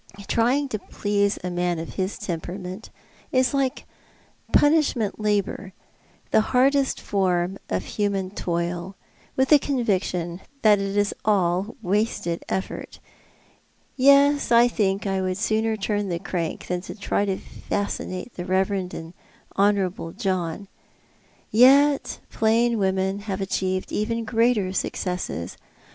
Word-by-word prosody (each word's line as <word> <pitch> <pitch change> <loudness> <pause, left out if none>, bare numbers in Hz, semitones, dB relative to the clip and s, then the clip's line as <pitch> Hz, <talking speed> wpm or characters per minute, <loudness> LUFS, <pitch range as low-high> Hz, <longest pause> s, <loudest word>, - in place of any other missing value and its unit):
Trying 255 +5 +2
to 215 - -3
please 205 0 0
a 180 - -3
man 175 0 0
of 165 +1 -6
his 190 +1 -2
temperament 180 +4 -6 0.4
is 255 -1 +2
like 270 -2 -1 0.7
punish 305 0 +4
ment 220 -4 -2
labour 205 -2 -1 0.3
— - - -34
the - - +5
hardest 265 +4 +2
form 185 -1 0
of 95 0 -1
human 200 -3 -1
toil 175 0 -3 0.2
— - - -32
with 265 0 +2
the 300 - +8
con 265 -4 -1
viction 180 -4 -1 0.2
that 210 -2 +6
it 195 +1 -2
is 205 0 +2
all 190 0 +1
wasted 185 -3 -1
effort. 190 - -4 1.0
Yes, 280 +1 +5
I 235 +1 +7
think 200 -4 0
I 195 -1 0
would 185 0 -1
sooner 220 +1 0
turn 205 0 -1
the 170 - -1
crank 170 -2 -4
than 180 0 -2
try 200 +1 -2
to 190 -1 -1
fascinate 200 +1 -4
the 175 - -6
reverend 190 0 0
and 165 +1 -8 0.4
honour 200 0 +3
able 170 -2 -6
John. 190 -3 -2 0.8
Y'et 275 +5 +5
plain 230 +1 +2
women 190 0 0
have 190 0 -2
achieved 185 -1 -2
even 230 +2 -1
greater 225 -4 +2
successes. 180 - -3
200 Hz, 135 wpm, -24 LUFS, 185-225 Hz, 1.0 s, the